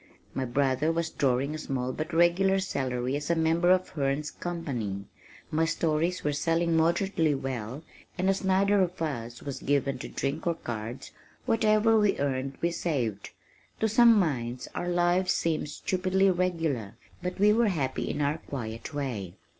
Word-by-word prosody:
My 130 - -1
brother 135 +4 +1
was 165 0 -1
drawing 135 +2 +1
a 155 - -5
small 130 -4 -2
but 155 +4 -4
regular 175 +3 +4
salary 130 -7 -2
as 145 +2 -4
a 170 - +3
member 165 +2 +2
of 185 0 +3
Herne's 140 +1 -1
company, 120 - -4 0.5
my 160 +1 +2
stories 165 +3 0
were 150 - 0
selling 165 +3 +1
moderately 165 -1 +2
well 130 +1 -4 0.3
and 185 +1 0
as 195 0 +1
neither 195 +1 +3
of 180 0 -1
us 120 -7 -4
was 140 -2 -5
given 140 -1 0
to - - -6
drink 145 +5 -3
or 170 - +2
cards, 120 -3 -6 0.3
whatever 220 0 +4
we 210 -1 +2
earned 135 -1 -2
we 170 - +1
saved. 125 - -2 0.5
To 220 - +2
some 230 +1 +6
minds 125 - -1
our 175 - -3
lives 175 +1 +2
seemed 160 -2 -1
stupidly 185 +4 +1
regular, 165 - -1 0.3
but 180 +1 -4
we 210 +1 +6
were 230 +1 +3
happy 140 -9 -1
in 150 - -2
our 145 +3 0
quiet 120 +1 -6
way. 115 -11 -4
160 Hz, 160 wpm, -28 LUFS, 135-180 Hz, 0.5 s, some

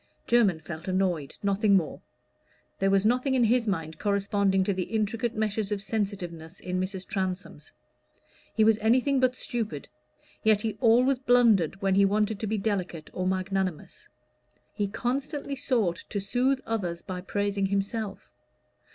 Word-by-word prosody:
Jermyn 215 -9 +3
felt 160 +1 -8
annoyed 185 -6 0
nothing 200 +1 +3
more. 165 -6 0 0.8
There 195 - +2
was 195 +1 +3
nothing 255 +4 +2
in 250 - +3
his 235 +1 +2
mind 160 -5 -2
corresponding 200 -1 +1
to 200 - 0
the 185 -1 -2
intricate 225 +2 -1
meshes 215 -1 -1
of 205 - 0
sensitiveness 190 -5 -4
in 185 0 -3
Mrs. 185 0 -3
Transome's. 185 -6 -4 0.8
He 220 - +4
was 220 0 +4
anything 255 +5 +3
but 255 0 +2
stupid; 225 - -4 0.5
yet 215 -1 +3
he 220 -1 -2
always 250 +3 +4
blundered 225 - +3
when 195 -1 +3
he 200 +1 +5
wanted 210 +1 +1
to 220 - -3
be 215 +1 0
delicate 190 -6 -3
or 185 0 -2
magnanimous; 185 -2 -2 0.7
he 205 - -1
constantly 275 +6 -3
sought 235 - 0
to 205 - -2
soothe 255 +7 +1
others 180 -7 -3
by 180 -1 -5
praising 200 +1 -1
himself. 200 +1 -3
200 Hz, 150 wpm, -27 LUFS, 185-225 Hz, 0.8 s, he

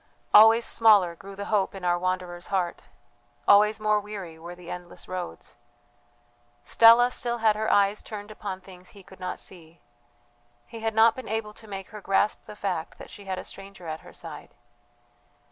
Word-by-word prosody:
Always 225 +2 +8
smaller 205 -6 +4
grew 195 +3 -11
the 200 +1 -6
hope 195 -2 +1
in 190 -2 -7
our 175 0 +2
wanderer's 180 -1 -3
heart, 185 -3 -2 0.6
always 210 +1 +5
more 215 0 +2
weary 195 -6 -8
were 170 +2 -9
the 175 -1 -10
endless 180 -1 -9
roads. 180 - -7 1.1
Stella 235 +2 +6
still 240 -1 -1
had 220 -2 +3
her 220 +1 -1
eyes 200 +1 +3
turned 210 -1 -8
upon 195 -3 -6
things 185 -1 -14
he 200 - -15
could 190 0 -16
not 185 0 -4
see. 170 -2 -12 0.9
He 230 - -10
had 225 0 -2
not 225 +1 +5
been 260 - -8
able 220 -1 -3
to 220 - -13
make 195 -2 -7
her 210 -1 -10
grasp 195 +2 0
the 210 - -10
fact 180 -5 -4
that - - -12
she 200 - -12
had 190 -1 -3
a - - -5
stranger 195 -2 -10
at 160 -1 -5
her - - -15
side. - - -10
200 Hz, 180 wpm, -26 LUFS, 180-215 Hz, 1.1 s, Always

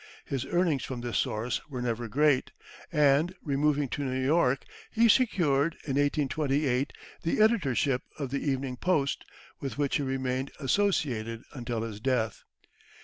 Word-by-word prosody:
His 135 -1 -3
earnings 170 -7 +1
from 130 -2 -5
this 120 -1 -1
source 110 +3 -1
were 130 -3 -5
never 120 -1 -2
great, 145 +3 +2 0.4
and, 150 +3 +3
removing 145 0 +1
to 145 - -3
New 130 -1 -1
York, 135 -1 +2 0.3
he 230 0 +4
secured, 170 - +3
in 140 - -3
1828, 140 -1 +1 0.3
the 165 - 0
editorship 140 - +3 0.2
of 140 -4 -4
the 140 - 0
Evening 135 -3 -1
Post, 150 -3 0 0.4
with 135 -1 -5
which 145 -2 +1
he - - -2
remained 130 0 -1
associated 130 - 0
until 120 -4 -3
his 110 -3 -6
death. 115 -3 0
135 Hz, 145 wpm, -29 LUFS, 125-150 Hz, 0.4 s, he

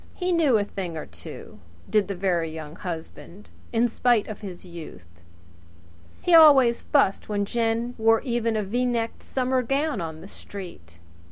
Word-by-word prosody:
He 365 0 -1
knew 310 -9 +4
a 205 - +1
thing 185 -5 -5
or 155 - -5
two, 85 -2 -11 0.3
did 210 -3 +2
the 200 - -4
Very 175 -3 0
Young 155 -1 -8
Husband, 175 +3 -8 0.2
in 235 +1 +3
spite 240 -1 +2
of 215 - -7
his 185 -3 -8
youth! 90 - -11 1.0
He 355 - +2
always 280 -7 +7
fussed 220 -10 +1
when 205 -1 0
Jen 230 +2 -1
wore 225 0 +4
even 235 -3 -1
a 210 - 0
V 235 +6 -1
necked 235 -2 -1
summer 260 0 0
gown 275 - -1
on 160 -1 -6
the - - -10
street. 170 - -11
215 Hz, 165 wpm, -25 LUFS, 175-245 Hz, 1.0 s, always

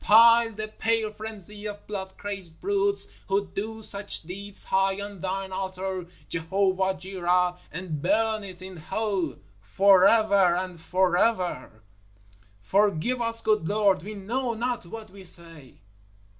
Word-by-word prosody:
Pile 230 +1 +7
the 215 +1 -4
pale 220 0 0
frenzy 210 -1 -7
of 205 0 -7
blood 190 -2 -6
crazed 195 -5 -6
brutes 400 0 +1 0.2
who 200 +1 +1
do 220 +2 -4
such 200 -3 -3
deeds 195 +4 -5
high 195 +1 +1
on 200 -1 -7
Thine 190 +1 -3
altar, 190 -1 -4 0.2
Jehovah 190 +3 +1
Jireh, 180 -1 +1 0.2
and 165 -3 -5
burn 215 +4 +1
it 185 -2 -9
in 185 -1 -9
hell 185 -1 -2 0.2
forever 195 - +5
and 180 -2 -4
forever! 180 - +1 0.8
_Forgive 205 +4 +2
us, 230 0 +1
good 215 -7 +2
Lord; 205 -3 +3
we 210 +4 -7
know 235 +5 -2
not 240 -4 -2
what 220 +1 -9
we 195 0 -12
say! 165 -6 -7
195 Hz, 130 wpm, -26 LUFS, 180-215 Hz, 0.8 s, Pile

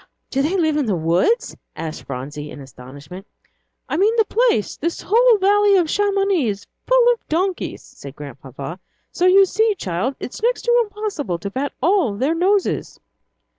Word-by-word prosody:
"Do 270 - +1
they 325 +7 0
live 315 -4 +1
in 285 -5 0
the 205 - +1
woods?" 175 - +1 0.2
asked 160 -1 -6
Phronsie, 145 +4 -6
in - - -10
astonishment. 140 +7 -12 0.6
"I - - -2
mean, 420 +5 +3
the 445 -2 +3
place 460 - +1
this 335 +3 -4
whole 470 +2 +4
valley 405 +1 +4
of 335 -4 +1
Chamonix 395 - +1
is 205 -1 -4 0.2
full - - +5
of 470 - -13
donkeys," 360 +3 -2
said 140 0 -12
Grandpapa, 140 +3 -9 0.3
"so 360 - +1
you 390 +1 +7
see, 430 +3 +1
child, 195 - -3
it's 250 - -7
next 485 +2 0
to 475 0 +3
impossible 405 - -4
to 200 +4 -6
pat 275 +5 -3
all 340 - +2
their 270 +9 0
noses." 380 +4 0
330 Hz, 170 wpm, -20 LUFS, -, 0.6 s, you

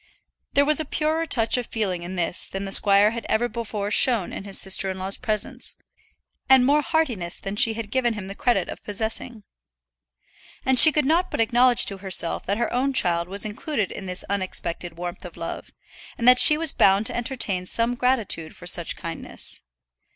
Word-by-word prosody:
There 285 - +3
was 305 0 +2
a - - -1
purer 315 +3 -2
touch 230 -2 +1
of 245 - -4
feeling 195 -6 -3
in 175 +2 -7
this 175 -1 0
than 195 +1 -6
the 195 - -6
squire 200 +1 +5
had 235 0 -6
ever 230 +2 +1
before 210 -3 -5
shown 225 -3 +2
in - - -7
his 195 -1 -1
sister 190 0 +2
in 190 - -5
law's 190 +1 -2
presence, 215 -4 -4 0.7
and 265 -1 +6
more 290 +3 +3
heartiness 265 - -2
than 195 +1 -6
she 220 +1 +3
had 220 -2 -7
given 240 -3 0
him 205 -3 -7
the 195 - -7
credit 200 -4 0
of - - -9
possessing. 220 +2 -4 1.2
And 260 -1 +4
she 315 - +11
could 300 -1 0
not 340 +5 +1
but - - -5
acknowledge 245 +2 +3
to 195 -1 -2
herself 185 -3 -2
that 200 +2 -1
her 235 - -2
own 265 +3 0
child 170 -7 +1
was 200 +3 -1
included 215 - -3
in 195 - -8
this 180 0 -3
unexpected 185 -3 -3
warmth 175 +1 -7
of 180 -3 -11
love, 165 - -7 0.5
and 235 - -2
that 250 0 +7
she 300 - +8
was 320 -2 0
bound 195 +3 +3
at - - -5
any - - -4
rate - - -11
to - - -6
entertain 190 -7 -2
some 230 +4 0
gratitude 235 -10 -1
for - - -13
such - - +1
kindness. - - -4
220 Hz, 205 wpm, -23 LUFS, 190-250 Hz, 1.2 s, she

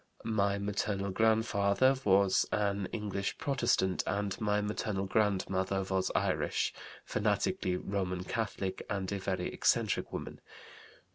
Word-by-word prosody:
"My 100 -3 +1
maternal 100 -1 -1
grandfather 110 +3 +3
was 100 -2 +4
an 100 -2 0
English 100 -2 -3
Protestant, 125 -10 +1
and 100 -1 -2
my 105 -1 +2
maternal 105 -1 -2
grandmother 95 -2 +1
was 95 0 0
Irish, - - 0 0.3
fanatically 90 - 0
Roman 90 -1 -2
Catholic, 100 -1 -3
and 100 -2 -2
a 100 - -2
very 95 -1 -2
eccentric - - +1
woman. - - -6
100 Hz, 115 wpm, -32 LUFS, 95-105 Hz, 0.3 s, was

